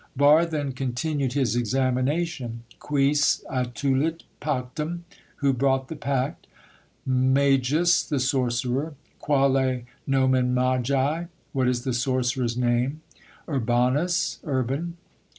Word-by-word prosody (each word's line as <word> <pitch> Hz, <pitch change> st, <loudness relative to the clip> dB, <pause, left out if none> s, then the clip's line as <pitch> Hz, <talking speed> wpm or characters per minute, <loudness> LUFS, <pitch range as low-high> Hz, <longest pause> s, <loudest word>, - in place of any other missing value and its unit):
Barre 150 Hz, +4 st, +5 dB
then 150 Hz, -4 st, -2 dB
continued 135 Hz, +1 st, -2 dB
his 130 Hz, -5 st, +1 dB
examination. 130 Hz, +1 st, -1 dB, 0.2 s
"Quis 145 Hz, +1 st, +2 dB
attulit 135 Hz, +5 st, -1 dB, 0.2 s
pactum?" 150 Hz, +4 st, -3 dB, 0.3 s
(Who 140 Hz, -1 st, +1 dB
brought 135 Hz, +1 st, +1 dB
the 160 Hz, -, -5 dB
pact?) 140 Hz, +1 st, -2 dB, 0.6 s
"Magus" 135 Hz, +5 st, +3 dB
(The 145 Hz, -3 st, -2 dB
sorcerer). 130 Hz, +3 st, 0 dB, 0.2 s
"Quale 135 Hz, -3 st, +2 dB, 0.3 s
nomen 130 Hz, -2 st, +2 dB
magi?" 130 Hz, +5 st, +1 dB, 0.3 s
(What 130 Hz, -3 st, +1 dB
is 125 Hz, -1 st, 0 dB
the 130 Hz, -2 st, -1 dB
sorcerer's 125 Hz, -1 st, 0 dB
name?) 125 Hz, +4 st, 0 dB, 0.5 s
"Urbanus" 140 Hz, +7 st, +1 dB
(Urban). 145 Hz, +4 st, -2 dB
135 Hz, 100 wpm, -25 LUFS, 125-145 Hz, 0.6 s, Barre